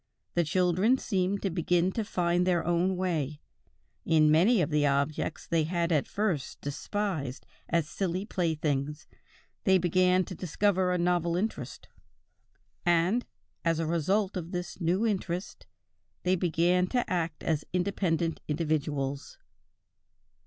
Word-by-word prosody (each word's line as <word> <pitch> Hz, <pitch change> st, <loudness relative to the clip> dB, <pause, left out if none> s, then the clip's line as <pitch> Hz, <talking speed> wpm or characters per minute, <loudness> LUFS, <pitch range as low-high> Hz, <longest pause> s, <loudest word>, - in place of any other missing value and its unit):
The 175 Hz, -, +2 dB
children 185 Hz, -, +2 dB
seemed 195 Hz, -4 st, -1 dB
to 195 Hz, -, 0 dB
begin 175 Hz, +1 st, +1 dB
to 225 Hz, -, -2 dB
find 180 Hz, -2 st, +1 dB
their 175 Hz, -2 st, +2 dB
own 175 Hz, +2 st, +1 dB
way; 155 Hz, -6 st, -1 dB, 0.6 s
in 155 Hz, -2 st, +4 dB
many 190 Hz, +9 st, +5 dB
of 165 Hz, -2 st, 0 dB
the 150 Hz, -1 st, +3 dB
objects 140 Hz, +2 st, -1 dB
they 165 Hz, -2 st, +1 dB
had 170 Hz, +1 st, -1 dB
at 150 Hz, -4 st, +2 dB
first 190 Hz, -10 st, -2 dB
despised 145 Hz, -2 st, -3 dB, 0.2 s
as 165 Hz, -2 st, +1 dB
silly 185 Hz, +2 st, -2 dB
playthings, 150 Hz, -5 st, -1 dB, 0.6 s
they 190 Hz, -2 st, +5 dB
began 185 Hz, +1 st, +3 dB
to -, -, -7 dB
discover 185 Hz, +1 st, +1 dB
a 180 Hz, -, +1 dB
novel 175 Hz, -1 st, +1 dB
interest, 215 Hz, +5 st, -4 dB, 1.0 s
and, 175 Hz, +7 st, +2 dB, 0.4 s
as 165 Hz, -1 st, +2 dB
a 165 Hz, -, -1 dB
result 185 Hz, +6 st, 0 dB
of 175 Hz, -2 st, -4 dB
this 180 Hz, +1 st, -5 dB
new 180 Hz, +6 st, +1 dB
interest, 185 Hz, -4 st, -3 dB, 0.6 s
they 185 Hz, +1 st, +3 dB
began 180 Hz, +1 st, +2 dB
to 245 Hz, +5 st, 0 dB
act 165 Hz, -4 st, -2 dB
as 155 Hz, -2 st, 0 dB
independent 175 Hz, -3 st, 0 dB
individuals." 145 Hz, -3 st, -2 dB
175 Hz, 130 wpm, -29 LUFS, 160-185 Hz, 1.0 s, many